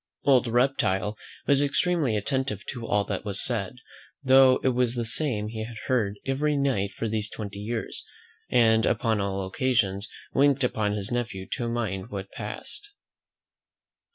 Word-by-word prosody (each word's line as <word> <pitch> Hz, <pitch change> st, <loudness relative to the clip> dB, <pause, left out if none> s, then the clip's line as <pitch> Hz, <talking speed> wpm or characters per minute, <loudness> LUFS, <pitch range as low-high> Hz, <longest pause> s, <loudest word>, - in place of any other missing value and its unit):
Old 130 Hz, -3 st, +4 dB
Reptile 115 Hz, -5 st, +1 dB, 0.3 s
was 140 Hz, 0 st, +4 dB
extremely 145 Hz, -4 st, +1 dB
attentive 115 Hz, -2 st, -2 dB
to 120 Hz, -3 st, -6 dB
all 105 Hz, -, +2 dB
that 100 Hz, -1 st, -4 dB
was 100 Hz, -2 st, -1 dB
said, 110 Hz, -3 st, +1 dB, 0.5 s
though 130 Hz, -1 st, +6 dB
it 130 Hz, -, +4 dB
was 125 Hz, -1 st, +1 dB
the 120 Hz, -1 st, -1 dB
same 115 Hz, -3 st, 0 dB
he 110 Hz, 0 st, -4 dB
had 115 Hz, 0 st, -8 dB
heard 105 Hz, -6 st, 0 dB
every 145 Hz, +2 st, +1 dB
night 125 Hz, -8 st, 0 dB
for 115 Hz, -, -3 dB
these 110 Hz, -1 st, -2 dB
twenty 100 Hz, -2 st, -7 dB
years, 115 Hz, +2 st, -4 dB, 0.5 s
and 110 Hz, -2 st, +4 dB
upon 110 Hz, -2 st, +1 dB
all 100 Hz, -1 st, -2 dB
occasions 100 Hz, -2 st, 0 dB, 0.2 s
winked 140 Hz, -1 st, +3 dB
upon 110 Hz, -4 st, 0 dB
his 105 Hz, +1 st, -4 dB
nephew 115 Hz, -6 st, -2 dB
to 120 Hz, -1 st, -2 dB
mind 110 Hz, -4 st, -3 dB
what 95 Hz, -1 st, -6 dB
passed. 115 Hz, -, -7 dB
115 Hz, 155 wpm, -26 LUFS, 105-130 Hz, 0.5 s, though